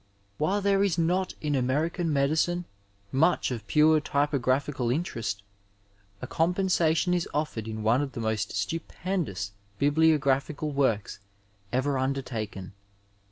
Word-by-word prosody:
While 195 +7 +1
there 200 0 +3
is 190 -4 +1
not 180 +3 +1
in 150 -1 -1
American 155 +6 0
medicine 155 +5 +1 0.5
much 160 +2 +2
of 115 -3 -5
pure 155 0 +5
typographical 140 -3 0
interest, 115 -8 -2 0.8
a - - -1
compensation 175 -1 +1
is 175 -1 0
offered 140 -8 -2
in 110 -1 -5
one 115 +5 +3
of 140 -2 -4
the - - -5
most 110 -2 -1
stupendous 150 - -3 0.3
bibliographical 145 0 +2
works 125 -10 0 0.5
ever 130 +2 0
under 135 +1 -1
taken. 105 -6 -6
145 Hz, 120 wpm, -27 LUFS, 125-165 Hz, 0.8 s, pure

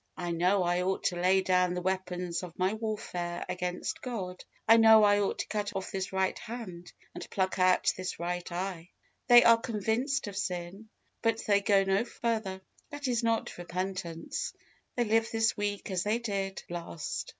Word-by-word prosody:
I 175 -1 -3
know 180 +3 +2
I 175 +1 +1
ought 190 +1 -1
to 180 - +1
lay 185 +2 +3
down 180 -1 +2
the 180 - -2
weapons 180 -2 -2
of 175 -2 -9
my 185 +2 +1
warfare 205 -6 -4
against 180 0 -3
God; 190 -8 -5 0.2
I 225 - +8
know 220 -1 +8
I 205 0 +5
ought 200 - 0
to - - -3
cut 205 -1 -3
off 190 -1 -4
this 190 -2 -3
right 190 0 0
hand, 195 -7 -8 0.2
and - - -8
pluck 190 0 -1
out 185 0 +4
this 185 0 -4
right 175 +1 -3
eye." 180 -1 -4 0.4
They 240 0 +9
are 230 0 +6
convinced 235 +5 -1
of 205 -2 -7
sin, 195 +2 -4 0.3
but 225 -1 0
they 200 -1 +3
go 200 -1 +4
no 195 +2 +2
further. 220 -6 -3 0.3
That 290 -2 -5
is 245 -1 +1
not 230 -5 -1
repentance. 175 -2 -4 0.4
They 245 - +2
live 225 0 +2
this 225 0 +2
week 205 -1 -3
as 185 -2 0
they 210 +4 +1
did 200 -4 -3
last. 170 -2 -5
190 Hz, 180 wpm, -30 LUFS, 180-220 Hz, 0.4 s, They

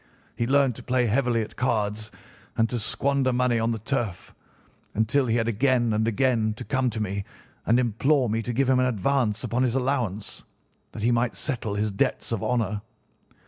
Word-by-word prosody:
He 115 - -1
learned 135 -1 +3
to - - -10
play 125 -1 +1
heavily 120 0 +1
at - - -10
cards 110 -3 -1 0.5
and 115 - +3
to 120 - -1
squander 135 +4 0
money 125 -1 +2
on 115 +1 +1
the 115 - -1
turf, 110 -4 -3 0.6
until 110 +5 +2
he 115 - +1
had 115 -1 +1
again 120 0 +2
and 110 +1 +1
again 115 -2 +1
to 125 - -7
come 130 -1 +1
to 110 - -4
me 100 -1 -2 0.4
and 115 +2 +4
implore 125 +3 +2
me 110 +1 0
to 120 - -3
give 130 +3 +1
him 130 -1 +4
an 130 - +3
advance 115 -1 0
upon 120 +2 -1
his 125 -1 +1
allowance, 125 -7 -2 0.5
that 105 - -6
he 120 - +3
might 120 0 +1
settle 115 -7 -3
his 105 +1 0
debts 100 - -1
of 115 -4 -1
honour. 105 -4 0
120 Hz, 190 wpm, -25 LUFS, 110-130 Hz, 0.6 s, and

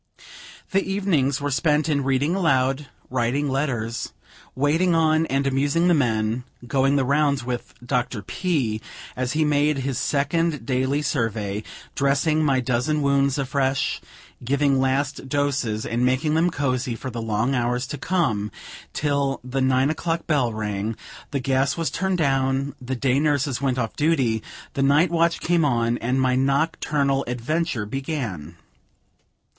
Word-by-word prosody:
The 195 0 +3
evenings 160 -9 +1
were 145 0 -2
spent 150 +2 +2
in 145 -3 +1
reading 135 +4 +1
aloud, 135 -6 +1 0.2
writing 130 +3 0
letters, 120 -5 -2 0.4
waiting 160 +6 +2
on 160 0 +3
and 135 +1 0
amusing 145 +5 +2
the 175 - +5
men, 115 -4 +1 0.2
going 135 +3 +2
the 135 -2 +2
rounds 140 -1 +2
with 125 0 -5
Dr. 125 -4 -1
P., 130 - -1 0.3
as 130 0 -2
he 155 0 +2
made 150 0 +2
his 135 -1 -2
second 150 -1 0
daily 130 +3 0
survey, 110 -7 -1 0.3
dressing 145 +3 +2
my 135 -3 +3
dozen 130 +5 0
wounds 140 -1 +2
afresh, 135 -1 0 0.4
giving 140 +1 +2
last 135 +1 -1
doses, 135 -6 0
and 120 +1 -1
making 130 +5 +1
them 165 +3 +3
cozy 130 -5 -1
for 130 +3 -6
the 115 0 -4
long 115 +4 0
hours 125 0 0
to 145 +3 -6
come, 115 - 0 0.4
till 140 -2 0
the 130 +1 -2
nine 130 +2 +3
o'clock 165 +1 -2
bell 140 -7 +1
rang, 105 0 -3 0.3
the 140 - -2
gas 135 +2 +1
was 165 -1 -1
turned 190 -1 0
down, 135 -2 +1
the 130 +1 -3
day 130 +1 +1
nurses 145 -3 0
went 130 -2 0
off 115 -3 -2
duty, 135 -8 +1 0.3
the 140 - -1
night 145 +6 +4
watch 170 0 +2
came 170 -1 +2
on, 120 -4 +1
and 125 +3 0
my 130 -1 +2
nocturnal 140 0 +1
adventure 125 0 -1
began. 110 - -4
135 Hz, 150 wpm, -23 LUFS, 125-150 Hz, 0.4 s, the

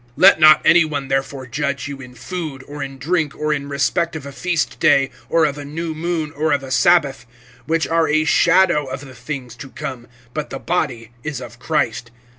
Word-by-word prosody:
(16)Let 190 -3 +7
not 155 -1 +8
any 170 +1 +6
one 145 -3 -4
therefore 135 0 -2
judge 140 +2 -3
you 140 -1 -7
in 125 -1 -12
food, 150 0 -6
or 145 0 -7
in 135 -1 -6
drink, 160 +1 -1
or 150 0 0
in 140 -1 -4
respect 145 +4 0
of 150 -3 -6
a 140 - -7
feast 175 +3 -2
day, 135 -2 +4 0.2
or 165 -1 +3
of 145 -1 -2
a - - -6
new 160 +3 -4
moon, 160 -1 -2
or 155 +1 0
of 140 -1 0
a 135 - -8
sabbath; 135 0 +3 0.4
(17)which 165 0 0
are 165 -1 +3
a 155 +1 +2
shadow 170 -1 +4
of 130 0 -6
the 135 -3 -11
things 125 -1 -7
to 125 +3 -10
come, 130 -5 -7 0.3
but 150 -1 -4
the 135 - -5
body 130 -9 -2
is 150 -4 -4
of 120 -1 -10
Christ. 120 -7 -1
145 Hz, 210 wpm, -20 LUFS, 135-160 Hz, 0.4 s, not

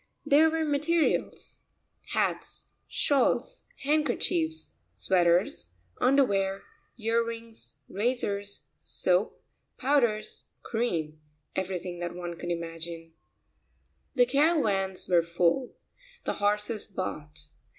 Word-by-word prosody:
There 310 +3 +6
were 320 0 0
materials, 305 +3 0 0.5
hats, - - -1 0.2
shawls, 280 -3 +1 0.2
handkerchiefs, 310 +3 0 0.2
sweaters, 175 - +2 0.3
underwear, 200 -8 +2 0.3
ear 230 0 +2
rings, 230 -1 -8
razors, 205 -2 -1 0.2
soap, 180 +3 0 0.3
powders, 235 -6 +1 0.2
cream, 165 -10 -2 0.3
everything 180 -2 -3
that 175 0 -4
one 175 -1 -5
could 175 +1 -6
imagine. 165 -1 -5 1.0
The 250 -2 +6
caravans 245 - +2
were 175 -2 +5
full. 170 +9 +1 0.5
The - - -1
horses 210 +1 0
bought. 155 -6 -5
205 Hz, 90 wpm, -28 LUFS, 175-260 Hz, 1.0 s, There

